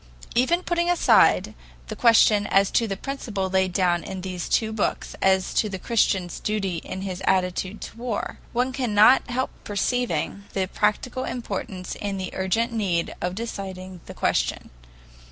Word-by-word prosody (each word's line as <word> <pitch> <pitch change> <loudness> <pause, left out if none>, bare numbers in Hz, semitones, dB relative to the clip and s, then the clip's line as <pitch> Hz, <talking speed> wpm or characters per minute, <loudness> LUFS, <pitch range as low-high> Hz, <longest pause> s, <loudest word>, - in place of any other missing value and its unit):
Even 335 +9 +2
putting 345 0 0
aside 355 - +4 0.3
the - - -5
question 220 -3 +5
as 195 0 +3
to 230 - +2
the 195 -2 -3
principle 205 -7 -4
laid 190 -1 +2
down 175 -2 +1
in 190 -1 -6
these 180 -2 -5
two 220 -1 +1
books 220 - -2
as 190 -1 +2
to 215 - +1
the 190 - -4
Christian's 190 -4 0
duty 195 -5 -1
in 185 +3 -6
his 190 -2 -5
attitude 185 +2 0
to - - -8
war, 235 -3 -4
one 250 +2 0
cannot 245 -1 +4
help 255 +2 -1
perceiving 200 -3 -1
the 190 -1 0
practical 215 +6 -1
importance 195 -6 -5
and 200 -1 -3
the 185 - -4
urgent 225 +6 0
need 185 -7 0
of 180 +1 -2
deciding 190 -5 -6
the - - -9
question. - - -1
200 Hz, 155 wpm, -24 LUFS, 185-235 Hz, 0.3 s, question